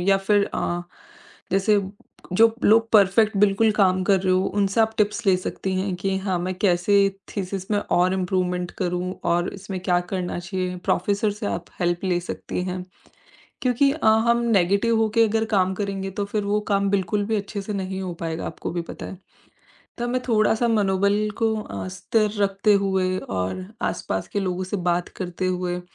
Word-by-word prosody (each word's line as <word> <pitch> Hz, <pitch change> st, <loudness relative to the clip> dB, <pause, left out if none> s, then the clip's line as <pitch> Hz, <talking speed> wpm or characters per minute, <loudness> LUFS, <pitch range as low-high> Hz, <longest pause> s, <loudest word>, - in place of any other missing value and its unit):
या 195 Hz, -, +6 dB
फ़िर 200 Hz, +1 st, +2 dB
अ, 175 Hz, 0 st, -1 dB, 0.7 s
जैसे 200 Hz, +1 st, +3 dB, 0.5 s
जो 225 Hz, +2 st, +5 dB
लोग 225 Hz, +1 st, +5 dB
परफेक्ट 210 Hz, +1 st, +4 dB
बिल्कुल 210 Hz, +2 st, +4 dB
काम 185 Hz, -3 st, +3 dB
कर 195 Hz, -2 st, +3 dB
रहे 185 Hz, -1 st, +1 dB
हो 185 Hz, +1 st, +2 dB
उनसे 200 Hz, +2 st, +2 dB
आप 220 Hz, 0 st, +3 dB
टिप्स 210 Hz, +2 st, +1 dB
ले 190 Hz, -2 st, +5 dB
सकती 190 Hz, +1 st, -3 dB
हैं 190 Hz, 0 st, -1 dB
कि 195 Hz, +1 st, -1 dB
हाँ, 190 Hz, -2 st, -1 dB
मैं 185 Hz, +1 st, -2 dB
कैसे 180 Hz, +1 st, +2 dB, 0.4 s
थीसिस 190 Hz, 0 st, -4 dB
में 205 Hz, -, +2 dB
और 185 Hz, -2 st, +1 dB
इम्प्रूवमेंट 180 Hz, -1 st, -1 dB
करूँ? 180 Hz, 0 st, -1 dB
और 175 Hz, +1 st, +1 dB
इसमें 195 Hz, -1 st, -6 dB
क्या 180 Hz, -1 st, +2 dB
करना 180 Hz, -2 st, -2 dB
चाहिए, 180 Hz, 0 st, -3 dB
प्रोफेसर 205 Hz, +3 st, +1 dB
से 210 Hz, 0 st, -5 dB
आप 175 Hz, -, -3 dB, 0.2 s
हेल्प 175 Hz, +1 st, 0 dB
ले 175 Hz, -2 st, +1 dB
सकती 180 Hz, +1 st, -5 dB
हैं। 180 Hz, 0 st, -4 dB, 0.8 s
क्योंकि 255 Hz, +2 st, +3 dB
अ, 310 Hz, -7 st, -3 dB, 0.2 s
हम 235 Hz, 0 st, +4 dB, 0.2 s
नेगेटिव 200 Hz, +6 st, +2 dB
होके 225 Hz, +1 st, +3 dB
अगर 220 Hz, +1 st, +1 dB
काम 190 Hz, 0 st, +2 dB
करेंगे 195 Hz, -1 st, -3 dB
तो -, -, +1 dB
फ़िर 205 Hz, 0 st, -2 dB
वो 205 Hz, +1 st, +1 dB
काम 200 Hz, 0 st, +2 dB
बिल्कुल 200 Hz, +1 st, 0 dB
भी 220 Hz, 0 st, 0 dB
अच्छे 200 Hz, 0 st, -4 dB
से 210 Hz, -, -5 dB
नहीं 190 Hz, 0 st, -3 dB
हो 180 Hz, -2 st, -4 dB
पाएगा, 165 Hz, -1 st, -3 dB
आपको 160 Hz, -, -5 dB
भी 175 Hz, -1 st, -2 dB
पता -, -, -7 dB
है। 185 Hz, -, -8 dB, 0.8 s
तो 240 Hz, 0 st, -2 dB
मैं 255 Hz, +1 st, 0 dB
थोड़ा-सा 220 Hz, +1 st, +3 dB
मनोबल 205 Hz, 0 st, +2 dB
को 225 Hz, -1 st, +2 dB
अ, -, -, -6 dB
स्थिर 210 Hz, +3 st, 0 dB
रखते 195 Hz, +2 st, +2 dB
हुए 185 Hz, -1 st, +1 dB
और 95 Hz, -, -3 dB, 0.3 s
आसपास 95 Hz, -, -4 dB
के 205 Hz, -, -2 dB
लोगों 185 Hz, -1 st, -2 dB
से 185 Hz, +3 st, -3 dB
बात 175 Hz, 0 st, 0 dB
करते 185 Hz, 0 st, -3 dB
हुए 180 Hz, -1 st, -1 dB
195 Hz, 185 wpm, -23 LUFS, 180-210 Hz, 0.8 s, या